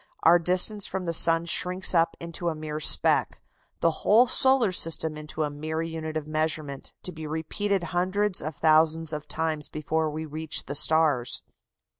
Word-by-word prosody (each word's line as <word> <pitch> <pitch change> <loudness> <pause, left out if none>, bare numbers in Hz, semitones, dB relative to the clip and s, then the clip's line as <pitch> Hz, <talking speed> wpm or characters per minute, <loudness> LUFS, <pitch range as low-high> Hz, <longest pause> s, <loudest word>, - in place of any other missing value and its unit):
Our 170 +2 +5
distance 185 +4 +1
from 190 -1 -5
the 170 - -2
sun 165 0 +6
shrinks 180 +3 +3
up 165 -1 +1
into 170 +1 -5
a 160 - -5
mere 155 0 -6
speck 155 - +3 0.4
the 165 - +2
whole 225 +5 +4
solar 260 -3 +3
system 160 -3 +1
into 155 +1 -6
a 150 - -4
mere 155 +2 -5
unit 160 -1 -6
of 155 - -6
measurement, 155 -2 -4
to 180 - -4
be 160 -2 -9
repeated 175 +5 -3
hundreds 185 +2 0
of 155 0 -6
thousands 160 +1 +1
of 150 0 -7
times 155 -2 -3
before 155 +1 -3
we 155 +1 -6
reach 155 +1 -4
the 140 - -6
stars. 145 -4 +2
160 Hz, 170 wpm, -25 LUFS, 155-175 Hz, 0.4 s, sun